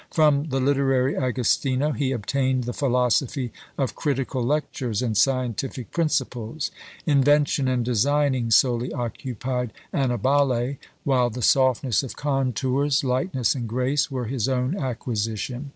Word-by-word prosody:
From 150 -2 +3
the 135 0 0
literary 135 0 +2
Agostino 130 +2 +1
he 140 -2 -1
obtained 130 +2 0
the 120 +1 -4
philosophy 125 -1 0 0.2
of 135 -3 -1
critical 135 -3 -2
lectures 125 -4 -1
and 115 -3 -1
scientific 130 -1 0
principles; 140 -4 -1 0.3
invention 145 -1 +3
and 125 -2 0
designing 130 +1 +1
solely 120 +2 +3
occupied 125 0 -3 0.2
Annibale; 130 0 +1 0.3
while 125 -3 +2
the 120 +1 -5
softness 130 -2 +3
of 135 - -7
contours, 135 0 0
lightness 130 - 0
and 120 -4 -4
grace, 130 +5 0
were 130 -3 -3
his 120 0 -1
own 130 +5 0
acquisition. 120 - -3
130 Hz, 120 wpm, -24 LUFS, 125-140 Hz, 0.3 s, From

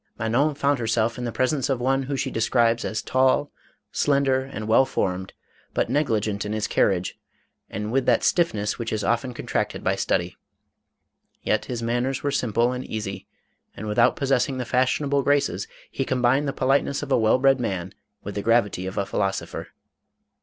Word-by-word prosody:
Manon 125 +7 +1
found 140 -1 +1
herself 115 +1 0
in 125 - -3
the 120 - -2
presence 130 +3 0
of 135 -3 0
one 135 +2 +1
who 135 +1 -3
she 135 0 -2
describes 115 0 +2
as 110 - -3
tall, 130 +2 +2 0.4
slender, 140 -2 +2
and 110 -5 -6
well 110 +4 +5
formed, 95 -6 -2 0.4
but - - 0
negli 140 -6 +2
gent 105 -1 -3
in 105 - -3
his 110 -1 -1
carriage, 95 -2 +1 0.5
and 105 +2 -4
with 135 +1 +1
that 120 -2 +3
stiffness 110 - +1
which 115 -1 -3
is 110 -1 -1
often 120 +4 0
contracted 120 - -3
by - - +1
study; - - -1 1.1
yet - - 0
his 120 -2 -4
manners 120 +3 -1
were 145 - 0
sim 125 -4 -1
ple 120 +3 +2
and 125 0 -4
easy, 100 -3 -5 0.5
and 105 - -6
without 105 +2 +3
possessing 135 0 +1
the 125 - -3
fashionable 140 +3 +1
graces, 140 -9 +1 0.2
he 135 - -1
combined 130 +2 +1
the - - 0
politeness 135 +2 +1
of 145 - -6
a - - +5
well 110 +2 +4
bred 135 0 +4
man 95 -6 -3 0.3
with 100 - -5
the 100 - -3
gravity 105 -5 +1
of 95 - -6
a 100 - +1
philosopher. 95 -1 -2
120 Hz, 180 wpm, -24 LUFS, 110-135 Hz, 1.1 s, well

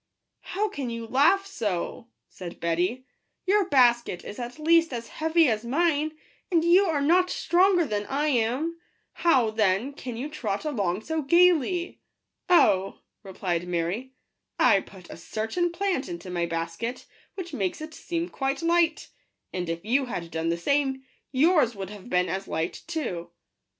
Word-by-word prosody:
" - - -56 0.2
How 420 +2 +1
can 285 - -5
you 230 0 -5
laugh 305 - +3
so 225 - -3
!" - - -55
said 175 -2 -9
Betty: 180 +10 -1 0.2
" - - -52
your 390 0 +2
basket 240 - +3
is 205 - -8
at 245 +2 -6
least 330 +1 +3
as 235 -1 -5
heavy 320 0 +2
as 220 -2 0
mine, 310 +3 0 0.3
and 335 -2 +3
you 360 +4 +6
are 315 -5 0
not 360 +5 +4
stronger 355 0 +3
than 205 -4 -3
I 290 +3 0
am; 270 +7 0 0.3
how, 260 -10 +3
then, 215 +4 +1
can 250 -4 -7
you 260 +5 -3
trot 235 -7 -4
along 205 - -1
so 320 +3 -2
gaily 345 +2 +3 0.2
?" - - -56
" - - -36
Oh," 195 - +4 0.2
replied 180 -3 -3
Mary, 180 +10 -2 0.2
" - - -56
I 195 - +5
put 190 -2 -13
a - - -9
certain 220 - -2
plant 360 -5 -1
into 175 +1 -7
my 170 -1 -1
basket, 165 +9 -4 0.3
which 350 -4 -7
makes 195 -8 -2
it 310 +1 -8
seem 340 +1 -3
quite 275 +1 -2
light; 335 -1 +2 0.4
and 180 -2 -3
if 165 +3 -4
you 265 +5 +2
had 175 -9 -5
done 160 +1 -1
the 170 - 0
same, 270 +6 0 0.3
yours 290 -3 +3
would 195 -1 -6
have 205 +2 -11
been 180 0 +2
as 190 +3 -3
light 160 +2 -3
too." 285 - -4
255 Hz, 175 wpm, -26 LUFS, -, 0.4 s, you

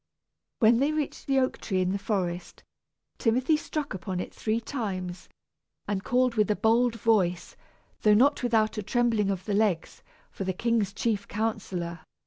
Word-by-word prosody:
When 230 0 +5
they 280 +3 +2
reached 305 -2 -3
the 270 -1 +2
oak 255 -1 +1
tree 190 -3 -1
in 185 0 +1
the 200 - -1
forest, 185 -4 -3 0.6
Timothy 255 +6 +2
struck 300 -1 -3
upon 185 0 -4
it - - -5
three 220 +1 -1
times 185 -8 -5 0.6
and 195 -2 -2
called 250 0 +2
with 215 -2 +2
a 210 - +3
bold 230 +2 +3
voice, 200 -6 +1 0.5
though 210 -1 +5
not 280 +7 +4
without 220 -3 +1
a - - -1
trembling 225 -2 +1
of 190 -2 -3
the 210 - -2
legs, 200 -5 0 0.3
for - - -5
the 190 0 -1
king's 225 -1 0
chief 205 -1 -1
counsellor. 195 -6 -3
215 Hz, 165 wpm, -27 LUFS, 190-240 Hz, 0.6 s, When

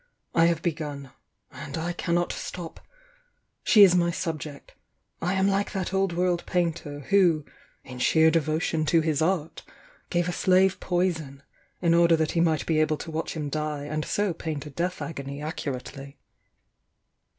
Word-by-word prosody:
I 165 - +5
have 165 -1 0
begun— 145 -5 -4 0.4
and 140 +3 -7
I 170 +2 -2
cannot 175 0 0
atop. 175 -3 -7 0.8
She 210 - +7
is 185 -3 +7
my 175 -1 +3
8^bject, 160 -4 -5 0.3
— - - -50
I 180 +3 0
am 190 0 +2
like 200 +1 0
that 190 -1 -3
old 195 -1 +1
world 175 0 0
painter, 165 -5 -2
who, 175 -7 +4 0.4
in 125 -1 -10
sheer 160 +4 +4
devotion 160 0 0
to 165 +1 +4
his 155 -2 0
art, 165 -2 -1 0.5
gave 175 -1 0
a - - 0
slave 185 +1 +3
poison, 160 -6 -2 0.4
in 170 -1 +4
order 170 0 +5
that 160 -1 0
he 165 - +1
might 160 -3 +1
be 160 -2 +1
able 155 0 +2
to 165 - -7
watch 160 +1 -3
him 150 -2 -3
die 150 0 -3
and 155 +1 -3
so 205 +1 0
paint 155 -3 -5
a 150 - -8
death 180 +5 -2
agony 140 -3 -6
accurately." 140 -3 -6
165 Hz, 165 wpm, -26 LUFS, 150-175 Hz, 0.8 s, She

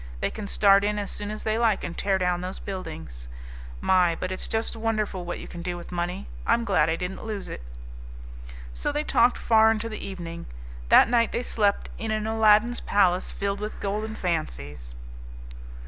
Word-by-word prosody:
They - - -1
can 210 -2 -6
start 200 0 +5
in 210 +1 0
as 205 -1 -3
soon 205 0 -5
as 215 0 -6
they 220 +1 0
like 225 -4 +2
and 170 - -5
tear 195 -1 +1
down 180 -1 0
those 185 +1 -5
buildings. 80 - -7 0.5
My! 180 -3 +3
but 185 +2 -4
it's 185 - -3
just 225 +1 -1
wonderful 215 -5 -2
what 175 - -4
you - - -9
can 170 - -8
do 175 0 -3
with 175 - -10
money. 175 - -3 0.2
I'm 235 - +3
glad 180 -7 +3
I 160 - +1
didn't 180 +2 -5
lose 215 -3 -5
it!" - - -7 1.1
So - - -2
they 295 +1 -1
talked 245 -4 +3
far 220 -1 +5
into 225 0 0
the 215 - -6
evening. 170 -4 -7 0.4
That - - +8
night 235 -1 +2
they 240 - -2
slept 205 -4 0
in 225 - -3
an 215 0 -1
Aladdin's 220 +2 +4
palace 185 -3 +2
filled 200 0 -2
with 210 +1 -5
golden 215 +2 -3
fancies. 75 - -4
200 Hz, 190 wpm, -26 LUFS, 175-220 Hz, 1.1 s, That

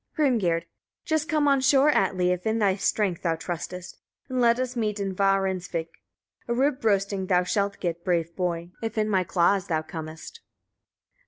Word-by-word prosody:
Hrimgerd. 220 - +2
22. - - -33 0.4
Just 315 0 0
come 305 -2 +2
on 275 -1 +4
shore, 275 +2 +5
Atli! 185 -6 +2
if 180 +3 -2
in 220 +1 +1
thy 200 -4 +2
strength 195 -2 0
thou 165 -2 0
trustest, 175 +2 -6 0.3
and 255 -1 0
let 235 0 +4
us 255 0 -2
meet 215 -3 -1
in 195 -1 -2
Varinsvik. 190 -3 0 0.6
A 235 - 0
rib 270 +2 +1
roasting 200 -2 +1
thou 180 -1 +3
shalt 200 +2 -1
get, 170 -1 -3
brave 170 -2 0
boy! 175 -1 -2
if 225 0 -4
in 215 0 +2
my 190 -3 +2
claws 180 +2 +2
thou 160 -2 0
comest. 160 - -8
195 Hz, 175 wpm, -26 LUFS, 175-235 Hz, 0.6 s, shore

